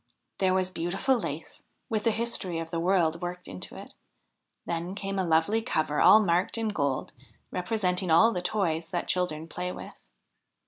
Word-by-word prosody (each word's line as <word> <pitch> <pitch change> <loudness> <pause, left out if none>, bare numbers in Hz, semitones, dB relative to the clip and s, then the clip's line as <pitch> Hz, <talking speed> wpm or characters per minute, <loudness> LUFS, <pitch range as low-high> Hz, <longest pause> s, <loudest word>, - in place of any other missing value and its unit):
There 185 -1 +3
was 185 0 +1
beautiful 190 +10 0
lace 165 - -5 0.3
with 215 -2 -2
the - - +5
history 225 -6 0
of 165 0 -5
the 165 - -1
world 170 -2 +2
worked 180 0 -5
into 90 - -7
it; - - -10 0.7
then 170 +3 -3
came 195 -1 -3
a - - +2
lovely 165 +6 +2
cover 155 -7 0
all 215 - +8
marked 180 0 +1
in 225 -1 0
gold 140 -9 -1 0.4
representing 180 -2 0
all 170 +8 +6
the 180 - -2
toys 170 -5 -1
that 175 - -2
children 165 -3 -1
play 180 +2 -4
with. - - -11
180 Hz, 170 wpm, -28 LUFS, 165-200 Hz, 0.7 s, all